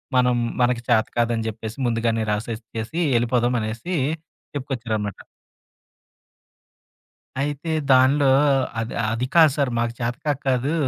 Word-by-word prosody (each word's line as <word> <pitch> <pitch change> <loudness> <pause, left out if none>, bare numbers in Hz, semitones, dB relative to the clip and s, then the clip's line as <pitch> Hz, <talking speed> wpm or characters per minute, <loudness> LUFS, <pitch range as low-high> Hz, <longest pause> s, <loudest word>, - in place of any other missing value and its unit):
మనం 125 -1 +4 0.3
మనకి 120 -1 +2
చేతకాదని 115 0 +1
జెప్పేసి 110 +2 -7
ముందుగానే 115 -1 0
రాసిచ్చేసి 115 +5 -4 0.2
ఎళ్ళిపోదాం" 120 +1 +1
అనేసి 115 +12 -4 0.6
చెప్పుకొచ్చారన్నమాట. 115 -7 -3 2.2
అయితే 145 +3 -3 0.2
దానిలో, 135 +2 +5 0.5
"అది 115 +1 -4 0.2
అది 115 +3 -1
కాదు 160 -3 +7
సార్, 140 -3 +1
మాకు 120 0 -1
చేతకాక 125 +4 -2
కాదు" 130 +3 +1
120 Hz, 100 wpm, -23 LUFS, 115-135 Hz, 2.2 s, కాదు